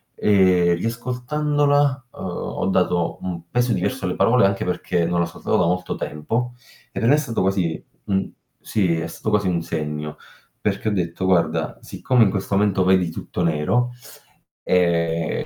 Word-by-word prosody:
Ehm, 90 -4 +4
riascoltandola, 135 - 0
uhm, - - -12
ho 90 - -3
dato 90 -2 +1
un 85 -2 -6
peso 125 0 +1
diverso 130 -7 -2
alle 90 - -1
parole, 115 -3 +4
anche 100 -1 0
perché 90 -1 -1
non 85 0 0
l'ascoltavo 85 0 -1
da 90 - +3
molto 90 +1 -1
tempo, 115 +11 -3 0.4
e - - -4
per 115 - +1
me 145 - +7
è - - +1
stato 125 -9 -2
così 95 -4 0 0.2
uhm, 95 -1 0 0.3
sì, 90 -6 0
è 80 - -3
stato 110 - -4
quasi 105 -2 +2
un 85 -2 0
segno, 75 -2 -4 0.4
perché 110 - -1
ho - - -1
detto: 90 -1 -2
"Guarda, 80 -3 +1
siccome 125 -3 +2
in 100 - +4
questo 100 +1 -2
momento 100 -2 +2
vedi 95 -2 +3
tutto 90 - -4
nero, 85 +11 +1 0.8
ehm, 85 -2 +1
95 Hz, 165 wpm, -22 LUFS, 85-115 Hz, 0.8 s, me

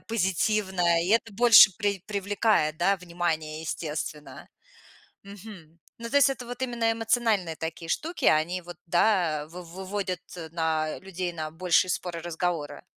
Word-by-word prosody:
позитивное. 190 -4 +1
И 175 - -3
это 225 0 +2
больше 225 -3 +8
прив 200 -3 -2
привлекает, 200 -5 +1
да, 195 +4 +2
внимание, 170 -3 -3
естественно. 150 -2 -6 0.8
Мгм. 195 -5 -12 0.2
Ну, 230 0 -6
то 285 - -4
есть 280 -1 +6
это 250 -3 -5
вот 245 +1 -7
именно 235 -2 0
эмоциональные 225 -7 0
такие 165 +1 -6
штуки. 330 - -2
Они 170 +4 +2
вот, 175 -1 -11
да, 175 -4 +2
э, - - -11
в 180 +3 -9
выводят 190 -1 -4 0.3
на 160 -2 -1
людей 185 -2 -4
на 155 -2 -5
большие 180 +2 +2
споры, 170 -2 -4
разговоры. 170 -2 -3
180 Hz, 145 wpm, -26 LUFS, 165-215 Hz, 0.8 s, больше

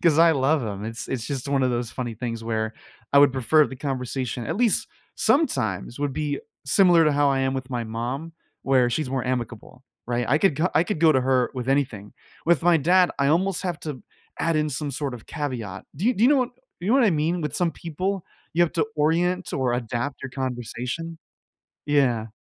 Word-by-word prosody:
'cause 160 -3 +4
I 165 0 +7
love 140 0 +2
him, 105 -2 -4
it's 115 +1 -5
it's 120 -3 -3
just 135 -3 -4
one 135 -1 +2
of 130 - +2
those 120 -1 -2
funny 120 -2 -4
things 115 0 -4
where, 110 -1 -2 0.4
I 140 - +7
would 140 -2 +6
prefer 145 +4 +3
the 130 - -8
conversation- 125 -3 -3
at 160 - -2
least 235 -2 +2 0.3
sometimes- 120 - +1
would 145 -2 -1
be 145 -1 -2 0.3
similar 170 +3 +5
to 150 - +4
how 145 0 +3
I 135 -1 +1
am 135 0 +1
with 130 -1 -4
my 125 -3 -2
mom 120 +8 -4 0.3
where 130 -2 +3
she's 125 +2 -2
more 130 -2 -2
amicable, 125 -1 -4 0.2
right? 120 0 0
I 140 +4 +4
could 185 -5 +2
ca 165 +5 +1
I 160 - +4
could 175 -3 -3
go 165 -2 +6
to 130 - +3
her 130 -1 +2
with 125 -2 -5
anything, 130 -7 -1 0.3
with 170 -3 +3
my 175 -1 +5
dad, 180 +4 +4
I 140 - +2
almost 180 +5 +2
have 175 -3 -2
to 145 -7 -6 0.4
add 165 -1 +1
in 150 0 +1
some 145 +1 -3
sort 135 0 -3
of 120 -3 -10
caveat, 120 -11 -5
do 180 +9 -1
you 250 - +3
do 220 +3 +2
you 260 - +6
know 295 - +5
what 250 -1 +1 0.3
you 180 - -3
know 235 - +4
what 270 -2 +5
I 210 - +4
mean? 165 +2 0
With 150 -3 -3
some 175 -2 +1
people 185 +3 -3 0.3
you 175 - +4
have 170 - +1
to 175 +4 +1
orient 175 +4 +1
or 125 -3 0
adapt 120 +4 -3
your 135 - -5
conversation? 130 +5 -4 0.7
Yeah. 130 -7 +2
140 Hz, 220 wpm, -24 LUFS, 125-165 Hz, 0.7 s, I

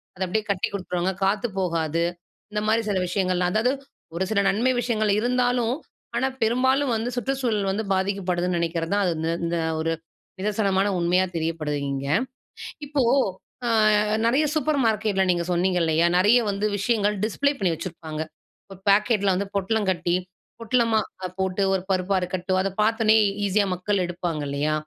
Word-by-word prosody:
அத 190 - -13
அப்படியே 210 +4 -1
கட்டி 190 -2 0
குடுத்துருவாங்க, 185 -1 -2
காத்து 205 +4 +1
போகாது. 165 -2 0 0.5
இந்த 210 0 -1
மாரி 225 +1 +3
சில 200 - +1
விஷயங்கள்லாம் 180 -1 0
அதாவது 230 +4 +2 0.4
ஒரு 185 - 0
சில 200 - +2
நன்மை 235 +6 +2
விஷயங்கள் 220 -3 0
இருந்தாலும். 245 0 +1 0.4
ஆனா, 265 - +1
பெரும்பாலும் 260 +4 +2
வந்து 225 +2 -2
சுற்றுச்சூழல் 245 -6 -1
வந்து 215 +3 -2
பாதிக்கப்படுதுன்னு 180 -2 0
நினைக்கிறது 165 0 -2
தான். 205 0 +2
அது 175 - +1
இந்த 160 +1 -1 0.2
இந்த 170 0 -1 0.2
ஒரு 165 +1 0 0.5
நிதர்சனமான 200 -1 +1
உண்மையா 180 +2 +2
தெரியப்படுது 160 -2 -2
இங்க. 135 0 -3 0.8
இப்போ, 290 -1 0 0.6
ஆ 235 - +1 0.6
நெறைய 270 +7 +3
சூப்பர் 305 -2 +1
மார்க்கெட்டில 215 -3 +1
நீங்க 175 -1 0
சொன்னீங்க 180 +1 +1
இல்லையா? 160 +1 +2
நெறைய 210 +6 +5
வந்து 200 +1 -2
விஷயங்கள் 210 0 +1
டிஸ்ப்ளே 280 +6 +1
பண்ணி 180 -4 +1
வச்சிருப்பாங்க. 160 -2 -6 0.5
ஒரு 190 - -11
பேக்கெட்டில 200 -1 +3
வந்து 200 +1 -2
பொட்டலம் 205 +1 0
கட்டி 175 -1 0 0.5
பொட்டலமா 230 -1 +2 0.4
போட்டு, 190 +1 -1
ஒரு 190 - 0
பருப்பா 185 +1 +1
இருக்கட்டும். 185 +1 -1
அத 195 - 0
பார்த்தோனே 220 0 +3 0.3
ஈஸியா 200 +1 +2
மக்கள் 185 +1 0
எடுப்பாங்கல்லையா? 155 -4 -2
195 Hz, 145 wpm, -24 LUFS, 175-220 Hz, 0.8 s, நெறைய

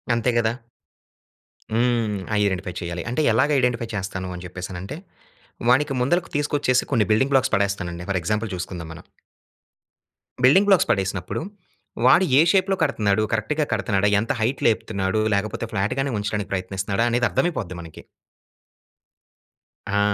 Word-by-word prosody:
అంతే 120 +1 +1
కదా! 115 -1 +2 1.2
హ్మ్. 115 -3 +1 0.2
ఐడెంటిఫై 95 -2 -1
చేయాలి. 85 0 -4
అంటే 125 +6 0
ఎలాగా 135 +7 +2
ఐడెంటిఫై 120 -2 0
చేస్తాను 95 -1 -4
అని 90 - -8
చెప్పేసనంటే, 90 +3 -7 0.7
వానికి 135 +4 +3
ముందలకి 170 +8 +1
తీసుకొచ్చేసి 145 -3 +1
కొన్ని 115 -5 +3
బిల్డింగ్ 135 +6 +2
బ్లాక్స్ 130 0 +3
పడేస్తానండి. 90 -4 -1
ఫర్ 95 - +1
ఎగ్జాంపుల్ 105 +5 -1
చూసుకుందాం 90 -2 -6
మనం. 80 - -12 1.4
బిల్డింగ్ 170 +11 +6
బ్లాక్స్ 195 -4 +4
పడేసినప్పుడు, 95 - -2 0.6
వాడు 135 +8 +6 0.2
ఏ - - +8
షేప్‌లో 195 0 +2
కడుతున్నాడు? 110 -8 +1
కరెక్ట్‌గా 145 +8 0
కడుతున్నాడా? 100 -2 +1
ఎంత 110 - -1
హైట్ 125 +5 0
లేపుతున్నాడు? 105 -2 0
లేకపోతే 105 +3 -2
ఫ్లాట్‌గానే 130 +8 -1
ఉంచడానికి 105 0 -3
ప్రయత్నిస్తున్నాడా? 100 +3 -1
అనేది 120 +1 +1
అర్థమైపోద్ది 110 - -1
మనకి. 80 -2 -11 1.9
ఆ! - - +3
110 Hz, 125 wpm, -23 LUFS, 95-130 Hz, 1.9 s, ఏ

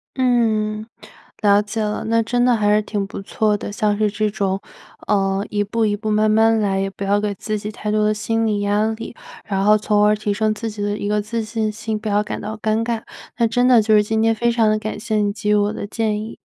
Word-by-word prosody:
嗯， 220 -4 +1 0.6
了 205 -2 +5
解 215 +2 -4
了， 210 0 -2
那 230 +1 +2
真 245 +2 +1
的 250 -1 +4
还 210 -1 +2
是 210 - +3
挺 205 -1 -2
不 - - -7
错 210 +1 0
的。 205 - -6
像 205 0 0
是 210 -1 +1
这 215 0 0
种， 195 -2 -2 0.5
呃， 195 -1 +1
一 205 -1 0
步 225 +2 0
一 205 - 0
步 215 0 -3
慢 215 +1 +3
慢 225 +1 +4
来， 195 -2 0
也 195 - 0
不 200 - -7
要 200 +1 +2
给 205 0 -1
自 215 +2 -4
己 210 +1 -5
太 210 - -5
多 210 0 +2
的 215 - +2
心 225 +1 -1
理 210 -2 0
压 205 +1 +1
力， 225 +1 -7 0.3
然 195 -1 -1
后 210 +1 +6
从 210 0 +2
而 210 0 +4
提 210 0 -2
升 215 +1 +1
自 225 +1 -4
己 210 -1 -5
的 205 0 -1
一 205 - -3
个 210 0 +1
自 220 +3 -3
信 220 0 -2
心， 220 0 -4
不 215 0 -5
要 205 0 +2
感 - - -5
到 215 +1 -5
尴 220 +1 0
尬。 230 -1 -2 0.4
那 235 - +3
真 245 +2 +2
的 245 -3 +6
就 215 0 +3
是 210 - +5
今 220 +1 0
天 225 0 +3
非 235 +2 +1
常 230 -2 +2
地 215 - +2
感 215 0 -5
谢 220 0 -3
你 205 -1 +1
给 210 0 -3
予 210 - +4
我 205 0 +1
的 205 - -5
建 215 -1 -1
议。 220 +1 -8
215 Hz, 280 characters per minute, -20 LUFS, 205-220 Hz, 0.6 s, 后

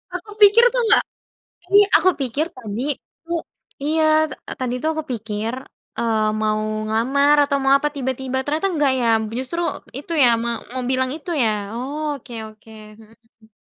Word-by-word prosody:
Aku 365 +4 -7
pikir 415 +3 +7
tuh, - - +2
nggak - - +5 0.6
ini 400 +2 +6 0.2
aku 365 +3 +5
pikir 270 +4 -1
tadi, 225 -1 -5 0.4
he 340 - -3 0.5
iya, 315 +2 +1 0.3
ta - - -10
tadi 255 -2 -2
tuh, 315 - 0
aku 315 - -3
pikir, 220 -1 -3 0.5
eee, 220 -2 +1 0.2
mau 215 0 +1 0.3
ngelamar 270 +7 +3
atau 280 0 0
mau 270 - +3
apa, 295 +2 -1
tiba-tiba, 265 -1 -3
ternyata 310 +6 0
enggak 295 -4 +2
ya, 230 -2 +3 0.2
justru, 265 +7 -3 0.4
itu 360 - -10
ya, 245 - +7
ma 235 - -1 0.2
mau 255 -1 -3
bilang 260 0 +1
itu, 325 +2 -7
ya. 225 - +3 0.3
Oh, 290 +5 -3
oke 245 -2 -13 0.2
oke, 215 +1 -18 0.3
mhm. 225 0 -22
260 Hz, 165 wpm, -21 LUFS, 230-305 Hz, 0.6 s, pikir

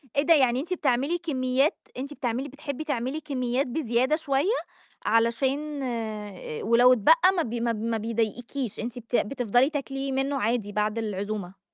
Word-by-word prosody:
إيه 280 - +3
ده! 330 - +6
يعني 260 -4 +4
أنتِ 350 +6 -3
بتعملي 280 +2 +1
كميات 270 -3 0
أنتِ 280 +3 -5
بتعملي 255 +1 -2
بتحبي 285 +1 -6
تعملي 285 +1 -2
كميات 260 -2 -1
بزيادة 255 +1 +1
شوية، 300 +4 0 0.5
علشان 270 +6 +1 0.8
ولو 245 +2 +6
اتبقى 325 - +5
ما 335 - +2
ب 235 - -5
ما 235 0 0
ب 215 -1 -4
ما 230 -1 0
بيضايقكيش، 230 +2 -3
أنتِ 240 +2 -4
بت 235 +1 -4
بتفضلي 245 +3 +2
تاكلي 275 -2 -3
منه 270 +1 0
عادي 220 -2 0
بعد 210 +2 0
العزومة. 200 -3 -4
255 Hz, 155 wpm, -26 LUFS, 230-285 Hz, 0.8 s, ده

